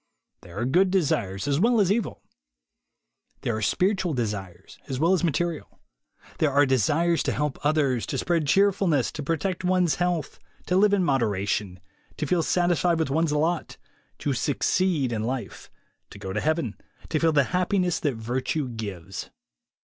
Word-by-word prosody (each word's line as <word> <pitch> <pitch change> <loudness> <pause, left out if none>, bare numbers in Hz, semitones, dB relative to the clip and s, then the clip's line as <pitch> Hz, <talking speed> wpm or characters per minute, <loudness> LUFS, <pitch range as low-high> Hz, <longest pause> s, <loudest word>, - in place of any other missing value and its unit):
There 85 +2 -12
are 120 - -1
good 180 +9 +3
desires 135 - 0
as 140 0 +1
well 230 +4 +3
as 195 -2 +3
evil. 220 -1 -2 1.2
There 115 - -1
are 110 - -3
spiritual 180 - +1
desires 100 -6 -5
as 130 -1 -3
well 165 +5 +3
as 185 - +1
material. 170 0 -2 0.6
There 155 -3 +2
are 145 +1 +4
desires 145 +7 +2
to - - 0
help 150 -2 -2
others, 145 -5 +1
to - - -3
spread 165 -4 0
cheer 200 +6 +5
fulness, 170 -9 0
to 155 - -6
protect 165 +5 -2
one's 180 -5 +2
health, 175 -4 -1 0.3
to 180 - 0
live 205 +1 +5
in 190 - +1
modera 115 - 0
tion, 95 -3 -2 0.4
to 155 - -2
feel 170 +4 +1
satisfied 175 0 +2
with 160 -4 -1
one's 160 +1 +1
lot, 160 +3 -1 0.4
to 145 - -2
"succeed'' 145 +2 +1
in 110 - -2
life, 125 +2 -5 0.4
to - - -12
go 95 -1 -6
to 105 - -1
Heaven, 155 -8 0 0.3
to 155 - 0
feel 165 0 +3
the 145 -3 +4
happiness 180 -1 +1
that 145 -5 -1
virtue 125 +5 -2
gives. 100 -5 -6
150 Hz, 170 wpm, -25 LUFS, 120-175 Hz, 1.2 s, cheer